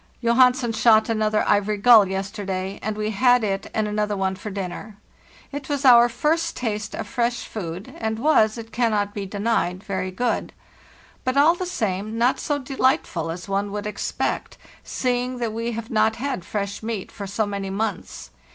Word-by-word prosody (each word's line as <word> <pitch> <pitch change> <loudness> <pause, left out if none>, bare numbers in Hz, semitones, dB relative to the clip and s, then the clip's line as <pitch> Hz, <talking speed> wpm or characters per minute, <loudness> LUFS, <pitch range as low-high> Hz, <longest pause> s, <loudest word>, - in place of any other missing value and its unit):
"Johansen 250 0 +3
shot 220 0 +4
another 215 -1 +1
ivory 205 0 +2
gull 220 -1 +7
yesterday, 195 0 -4
and 215 0 -3
we 215 0 -1
had 245 +3 +4
it 195 -2 -2
and 220 -1 0
another 210 0 -1
one 190 0 0
for 190 +3 -7
dinner. 195 +2 -6 0.5
It 285 0 -6
was 285 -1 -1
our 240 -1 +8
first 325 +7 0
taste 215 -3 -3
of - - -4
fresh 235 +2 -1
food, 185 -2 -6
and 220 0 -2
was, 225 -5 +3
it 225 -1 -8
cannot 215 -4 0
be 200 -2 -4
denied, 200 -2 -1
very 190 -2 -3
good; 240 +6 -2 0.7
but 255 +1 -1
all 300 +4 +6
the 360 +1 -4
same 215 - -2
not 240 +3 +2
so 290 -2 -1
delightful 260 - 0
as 175 +4 -6
one 200 +1 -1
would 210 0 -4
expect, 210 - -3 0.3
seeing 250 0 -1
that 235 -3 -2
we 230 +1 -3
have 230 +1 -6
not 220 0 +2
had 260 -6 -3
fresh 200 +1 -4
meat 220 -3 -4
for 200 - -7
so 210 +3 -1
many 200 -1 -4
months. 195 - -4
215 Hz, 175 wpm, -23 LUFS, 200-240 Hz, 0.7 s, our